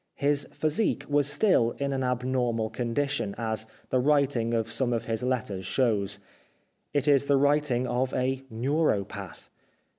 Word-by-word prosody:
His 145 0 +1
physique 155 +8 0
was 145 -1 +2
still 145 - +3
in 140 0 -1
an 135 - -1
abnor 125 -1 0
mal 110 -1 -2
condition, 120 -2 -1
as 110 -1 -2 0.2
the 130 - +3
writing 135 -4 +2
of 115 -1 0
some 120 +1 +1
of 115 - -2
his 115 -1 -2
letters 115 -7 -2
shows. 100 -5 +1 0.7
It 145 0 0
is 140 -1 +4
the 140 - +4
writing 140 -3 +2
of 125 +1 -1
a 130 +1 0
neuropath. 125 -3 -2
130 Hz, 150 wpm, -27 LUFS, 115-140 Hz, 0.7 s, is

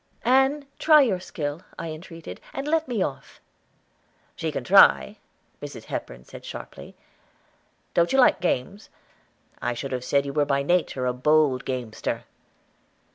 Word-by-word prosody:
"Ann, 270 +3 +3
try 305 -2 +6
your 200 -8 0
skill," 150 -3 -5 0.2
I 165 -1 -5
entreated, 160 - -10
"and 275 +1 -4
let 320 0 +1
me 230 -7 0
off." 135 - -6 1.0
"She - - -3
can - - -4
try," 65 0 +5 0.4
Mrs. - - -8
Hepburn - - -6
said - - -12
sharply. - - -9 1.0
"Don't 170 0 +2
you 270 - +2
like 250 - +5
games? 180 +4 -2 0.7
I 120 0 -1
should 135 +3 -5
have 125 -1 -3
said 140 +2 +1
you 140 - -5
were 150 0 +2
by 140 -1 0
nature 155 -5 0
a 125 - +1
bold 140 0 +2
gamester." 125 -4 -4
155 Hz, 145 wpm, -25 LUFS, 130-205 Hz, 1.0 s, try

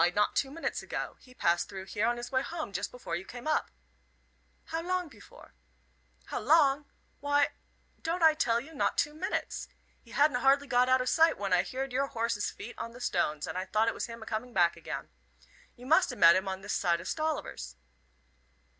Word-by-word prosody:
"Why, - - +5
not 210 +3 +1
two 270 - +1
minutes 325 +4 -3
ago. - - -4
He 255 -1 -18
passed 170 -3 +1
through 190 -2 -7
here 205 +3 0
on 240 0 +1
his 240 +1 -6
way 260 -1 +2
home 315 -7 -5
just 195 - -2
before 240 -9 -5
you 175 - -4
came 240 +4 -10
up." 310 - +1 1.0
"How 325 - -3
long 360 -2 -2
pefore?" - - -16 0.7
"How - - -3
long! 295 -2 +4 0.3
Why, 285 0 +3 0.5
don't 335 +1 -1
I 320 -1 +8
tell 235 -7 +2
you, 295 +7 -11
not 285 - 0
two 295 - +1
minutes. 320 +5 -3 0.3
He 235 - -21
hadn't 280 0 +3
hardly 275 +2 +4
got 250 -1 +3
out 260 0 +5
o' - - -2
sight 325 +5 +4
when 200 -2 -1
I 180 - +5
heerd 265 0 -4
your 275 +2 +1
horse's 230 -4 -1
feet 220 +4 -9
on 230 0 -5
the 245 - -11
stones, 155 -9 0
and - - -6 0.2
thought 220 +1 +3
it - - +2
was - - -4
him 230 -1 -8
a - - -11
coming 230 +3 -4
back 175 -4 +4
again. - - -6 0.7
You 250 - -13
must 320 +3 +4
a - - -6
met 170 -5 +7
him 190 +1 0
this 205 - -3
side 170 -2 +2
o' - - -7
Stolliver's." 300 - -3
250 Hz, 210 wpm, -30 LUFS, 205-290 Hz, 1.0 s, I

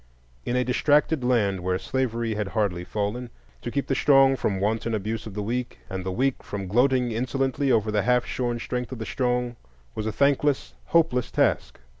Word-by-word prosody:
In 120 - 0
a 125 - +2
distracted 145 +3 +2
land 105 -6 +2
where 90 +1 -1
slavery 115 -1 -1
had 105 -1 -2
hardly 95 -5 -1
fallen, 105 +6 -3 0.3
to - - -4
keep 140 +3 -1
the - - -1
strong 135 0 +5
from 100 -6 -1
wanton 110 +3 0
abuse 110 +2 -3
of 100 - -9
the 105 - -2
weak, 120 +3 -3
and 95 -1 -3
the 95 - -3
weak 130 +6 0
from 100 -1 -5
gloating 125 +4 +2
insolently 135 +3 0
over 110 -2 +2
the 105 -1 +2
half 125 +2 +2
shorn 120 -2 -2
strength 125 +1 -4
of 130 - -5
the 110 - -5
strong, 125 -1 -1 0.4
was 110 0 -3
a - - 0
thankless, 140 +3 +1
hopeless 155 -8 +2
task. - - 0
120 Hz, 190 wpm, -25 LUFS, 105-130 Hz, 0.4 s, strong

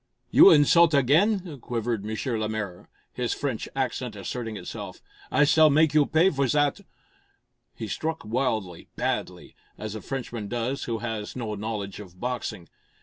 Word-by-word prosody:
"You - - +9
insult 160 +1 +6
again!" 165 - +2
quivered 115 -3 -3
M. 110 - -3 0.2
Lemaire, 105 -4 -4 0.2
his 125 -1 -2
French 135 -6 -3
accent 130 -3 -2
asserting 110 +2 -5
itself. 90 - -7 0.3
"I 145 - +4
s'all 155 +1 +6
make 155 +1 +4
you 150 -2 +4
pay 170 +5 +4
for 140 -2 0
zat!" 145 +6 +1 0.9
He - - -5
struck 160 -5 -3
wildly, 110 -7 -2
badly, - - -3 0.2
as 110 -1 -5
a 110 - -6
Frenchman 120 -3 -5
does 120 +5 -2
who 115 -1 -2
has 110 -3 -4
no 115 -4 -4
knowledge 105 -2 -4
of 90 -3 -12
boxing. 120 -7 -4
120 Hz, 145 wpm, -26 LUFS, 110-145 Hz, 0.9 s, You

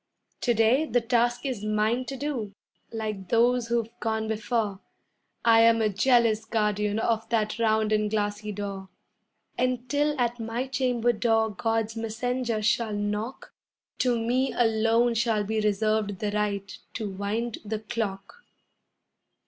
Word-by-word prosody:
To 240 -2 +2
day 230 +7 +4
the 245 - +2
task 240 +2 +1
is 250 -6 -3
mine 215 +4 +1
to 270 - -5
do, 245 -8 -4 0.4
like 215 -4 -4
those 240 +1 +3
who've 230 -1 -1
gone 220 -1 -1
before 220 -2 -1 0.7
I 225 -1 +6
am 230 0 +5
a 220 -1 +2
jealous 225 +1 +3
guardian 210 -2 0
of 225 0 0
that 215 -1 0
round 220 -1 +2
and 215 -1 +2
glassy 210 0 -2
door, 195 -1 -5 0.7
And 250 0 0
'til 295 +1 +1
at 240 0 0
my 230 +3 -2
chamber 250 -3 +1
door 225 -1 +2
God's 225 +2 -1
messenger 230 0 -2
shall 220 0 +1
knock 210 +4 -3 0.5
To 245 -2 +2
me 250 +3 +1
alone 230 +1 +3
shall 225 -2 +1
be 220 +1 -1
reserved 210 -1 0
the 205 +2 -2
right 205 -2 -2 0.2
to 215 - -3
wind 205 +4 -3
the 215 0 -3
clock. 215 - -5
225 Hz, 140 wpm, -27 LUFS, 210-240 Hz, 0.7 s, I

